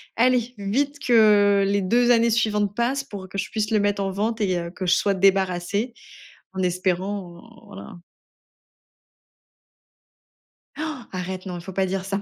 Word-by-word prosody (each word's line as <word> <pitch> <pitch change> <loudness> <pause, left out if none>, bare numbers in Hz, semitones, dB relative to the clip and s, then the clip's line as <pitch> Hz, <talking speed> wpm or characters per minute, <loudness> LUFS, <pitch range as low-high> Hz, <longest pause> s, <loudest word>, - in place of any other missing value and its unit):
«Allez 250 0 +2
vite 280 +8 -1
que 210 -4 +4
les 200 0 +1
2 240 +6 +3
années 235 0 +4
suivantes 210 -3 0
passent 260 +4 0
pour 200 -7 -9
que 195 +1 -5
je - - -3
puisse 215 0 -2
le 215 - +3
mettre 205 -1 0
en 195 - -2
vente 220 +3 -2
et 185 -4 +1
heu, 170 - -5
que 185 +2 -6
je 180 - +3
sois 200 +1 +1
débarrassée 195 +4 +1 0.6
en 190 0 -4
espérant». 180 0 -2 0.3
Voilà. 200 - -10 2.8
Han, 305 -5 -5
arrête, 185 +1 -5
non, 180 -1 -5
il 170 - -8
faut 190 - -8
pas 190 0 +1
dire 190 0 -3
ça. 195 0 -2
200 Hz, 160 wpm, -23 LUFS, 190-230 Hz, 2.8 s, que